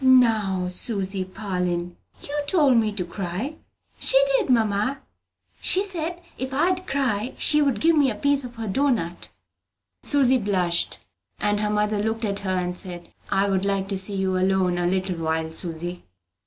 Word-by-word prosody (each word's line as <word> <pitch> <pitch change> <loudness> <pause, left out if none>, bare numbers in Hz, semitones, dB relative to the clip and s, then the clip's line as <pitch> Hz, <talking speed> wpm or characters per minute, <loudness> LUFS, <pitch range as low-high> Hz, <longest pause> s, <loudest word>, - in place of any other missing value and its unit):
"Now, 220 -8 +4
Susy 190 0 +2
Parlin, 180 -3 -3 0.3
you 290 +1 -3
told 290 -6 +4
me 220 -2 +2
to 195 -4 -3
cry! 195 - -5 0.4
She - - +5 0.2
did, 460 - +1
mamma. 225 +2 +1 0.6
She 380 - +2
said 350 -3 -3 0.2
if 260 0 -3
I'd 365 +5 +1
cry 250 -4 -1
she'd 285 -7 +3
give 330 +5 +4
me 285 -3 +4
a 220 - -3
piece 285 +5 +2
of 245 -1 -8
her 225 -1 -5
doughnut." 210 -7 -1 0.7
Susy 265 -3 +3
blushed; 180 -5 0 0.4
and 205 0 +1
her 210 0 0
mother 210 0 0
looked 220 +1 -1
at 200 -1 -2
her, 190 -1 -2
and 180 0 -2
said, 175 -2 -6 0.2
"I 195 +1 +2
would 190 -1 0
like 195 -1 0
to 195 - -1
see 195 +1 -3
you 190 -1 0
alone 185 -1 +1
a 175 - +1
little 185 0 -1
while, 160 0 -2
Susy." 175 +1 -4
205 Hz, 165 wpm, -24 LUFS, 185-260 Hz, 0.7 s, She